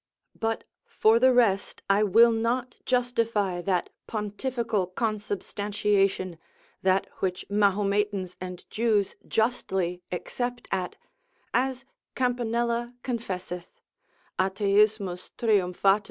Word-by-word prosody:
But 225 Hz, 0 st, -1 dB, 0.2 s
for 220 Hz, +2 st, +4 dB
the 260 Hz, +1 st, +6 dB
rest 220 Hz, -6 st, +2 dB
I 195 Hz, +1 st, +4 dB
will 225 Hz, +3 st, +6 dB
not 235 Hz, +3 st, -1 dB
justify 230 Hz, -7 st, +1 dB
that 180 Hz, -1 st, 0 dB, 0.2 s
pontificial 215 Hz, -1 st, -1 dB
consubstantiation, 200 Hz, -2 st, -1 dB, 0.4 s
that 190 Hz, 0 st, +3 dB
which 185 Hz, -1 st, -2 dB
Mahometans 200 Hz, -2 st, +1 dB
and 180 Hz, -1 st, -7 dB
Jews 215 Hz, -3 st, +1 dB
justly 190 Hz, -6 st, 0 dB
except 245 Hz, +7 st, -3 dB
at, 185 Hz, -2 st, -1 dB, 0.6 s
as 260 Hz, +1 st, 0 dB, 0.3 s
Campanella 240 Hz, -1 st, 0 dB
confesseth, 185 Hz, -8 st, -5 dB, 0.6 s
Atheismi 200 Hz, -1 st, +2 dB
triumphat. 195 Hz, -2 st, +3 dB
210 Hz, 90 wpm, -27 LUFS, 190-235 Hz, 0.6 s, the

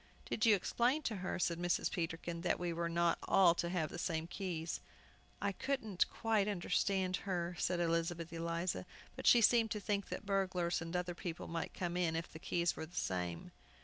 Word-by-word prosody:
"Did 220 Hz, -, +1 dB
you 215 Hz, -, +8 dB
explain 245 Hz, -, +1 dB
to 220 Hz, -6 st, -1 dB
her," 185 Hz, 0 st, -2 dB
said 170 Hz, -1 st, 0 dB
Mrs. 175 Hz, 0 st, +1 dB
Peterkin, 170 Hz, -1 st, -3 dB
"that 180 Hz, -, +1 dB
we 175 Hz, -1 st, -1 dB
were 170 Hz, 0 st, -1 dB
not 170 Hz, 0 st, +2 dB
all 180 Hz, -3 st, +6 dB
to 170 Hz, 0 st, -2 dB
have 170 Hz, -4 st, -1 dB
the 175 Hz, -, -5 dB
same 165 Hz, -2 st, -1 dB
keys?" 170 Hz, -2 st, -3 dB, 0.6 s
"I 200 Hz, -, 0 dB
couldn't 220 Hz, -3 st, 0 dB
quite 220 Hz, -3 st, +1 dB
understand 190 Hz, -1 st, +1 dB
her," 175 Hz, -2 st, -2 dB
said 180 Hz, -1 st, +1 dB
Elizabeth 170 Hz, 0 st, 0 dB
Eliza, 170 Hz, +1 st, -2 dB, 0.3 s
"but -, -, -3 dB
she 240 Hz, -, +8 dB
seemed 230 Hz, -1 st, +5 dB
to 210 Hz, -, -2 dB
think 200 Hz, -1 st, -1 dB
that -, -, -5 dB
burglars 185 Hz, -4 st, 0 dB
and 165 Hz, +2 st, -5 dB
other 180 Hz, 0 st, -1 dB
people 170 Hz, -1 st, -5 dB
might 165 Hz, 0 st, -4 dB
come 175 Hz, -1 st, -2 dB
in 170 Hz, -3 st, +1 dB
if 165 Hz, +1 st, -4 dB
the 160 Hz, -, -8 dB
keys 170 Hz, 0 st, 0 dB
were 160 Hz, -, -5 dB
the 175 Hz, -, -16 dB
same." 90 Hz, -, -2 dB
175 Hz, 195 wpm, -36 LUFS, 170-195 Hz, 0.6 s, you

